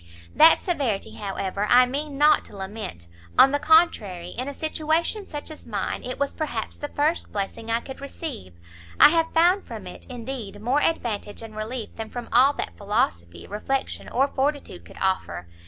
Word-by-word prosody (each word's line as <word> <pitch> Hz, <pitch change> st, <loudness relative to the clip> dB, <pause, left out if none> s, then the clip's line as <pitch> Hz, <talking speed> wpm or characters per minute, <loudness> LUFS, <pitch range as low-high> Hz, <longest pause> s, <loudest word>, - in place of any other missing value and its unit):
"That 320 Hz, +1 st, +7 dB
severity, 270 Hz, -, -1 dB
however, 200 Hz, 0 st, -3 dB
I 250 Hz, +1 st, +7 dB
mean 280 Hz, +3 st, -4 dB
not 300 Hz, +1 st, +5 dB
to -, -, -10 dB
lament; 190 Hz, -, -6 dB, 0.3 s
on 270 Hz, -, +8 dB
the 285 Hz, -, +1 dB
contrary, 255 Hz, -, +3 dB
in 255 Hz, +7 st, -5 dB
a 285 Hz, -, -4 dB
situation 320 Hz, +6 st, -1 dB
such 295 Hz, +1 st, -6 dB
as 310 Hz, -, -11 dB
mine, 205 Hz, -4 st, -3 dB
it 250 Hz, -, -5 dB
was 280 Hz, 0 st, -1 dB
perhaps 240 Hz, -8 st, -4 dB
the 290 Hz, -, -5 dB
first 300 Hz, +3 st, -1 dB
blessing 205 Hz, +3 st, -4 dB
I 230 Hz, +1 st, +1 dB
could 265 Hz, +2 st, -9 dB
receive; 280 Hz, -, -7 dB, 0.4 s
I -, -, +10 dB
have 325 Hz, 0 st, +1 dB
found 355 Hz, +4 st, +3 dB
from -, -, -8 dB
it, -, -, -9 dB
indeed, 240 Hz, -4 st, -6 dB
more 250 Hz, +7 st, +1 dB
advantage 225 Hz, -9 st, -1 dB
and 220 Hz, -1 st, -10 dB
relief 220 Hz, +2 st, -5 dB
than 220 Hz, -1 st, -5 dB
from 245 Hz, -1 st, -7 dB
all 270 Hz, +3 st, +6 dB
that -, -, -4 dB
philosophy, 85 Hz, -, -1 dB
reflection 265 Hz, +6 st, -3 dB
or 265 Hz, +3 st, +3 dB
fortitude 275 Hz, -, -2 dB
could -, -, -14 dB
offer. 190 Hz, -, -1 dB
250 Hz, 175 wpm, -25 LUFS, 205-295 Hz, 0.4 s, I